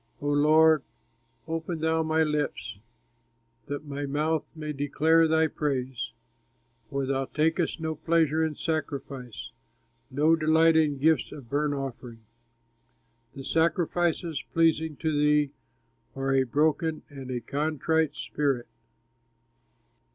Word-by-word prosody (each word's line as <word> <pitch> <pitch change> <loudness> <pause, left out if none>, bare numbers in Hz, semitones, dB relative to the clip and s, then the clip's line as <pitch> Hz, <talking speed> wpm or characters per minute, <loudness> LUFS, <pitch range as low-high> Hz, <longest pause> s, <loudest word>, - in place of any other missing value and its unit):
O 145 - -4
Lord, 155 +1 +5 0.7
open 165 0 -3
thou 160 0 +2
my 160 0 +2
lips, 150 -8 -2 0.9
That 145 +2 -5
my 145 0 -4
mouth 155 +3 -1
may 155 -1 -5
declare 155 +3 +3
thy 160 0 +3
praise! 130 -6 -2 0.8
For 140 -1 -2
thou 135 0 -1
takest 160 +5 0
no 160 0 -2
pleasure 160 0 +1
in 160 -1 -1
sacrifice, 135 -8 -4 0.6
No 150 +5 +3
delight 160 +1 +4
in 150 -3 +3
gifts 150 -1 +2
of 130 -6 -11
burnt 145 0 +1
offering. 125 -4 -7 1.1
The 135 - -7
sacrifices 165 0 0
pleasing 160 -1 +2
to 155 +1 -1
thee 150 -1 +3 0.6
Are 135 0 -1
a 135 -1 +3
broken 155 +4 0
and 135 -3 -9
a 125 -1 -2
contrite 150 +4 0
spirit. 135 -5 -1
150 Hz, 115 wpm, -27 LUFS, 140-160 Hz, 1.1 s, Lord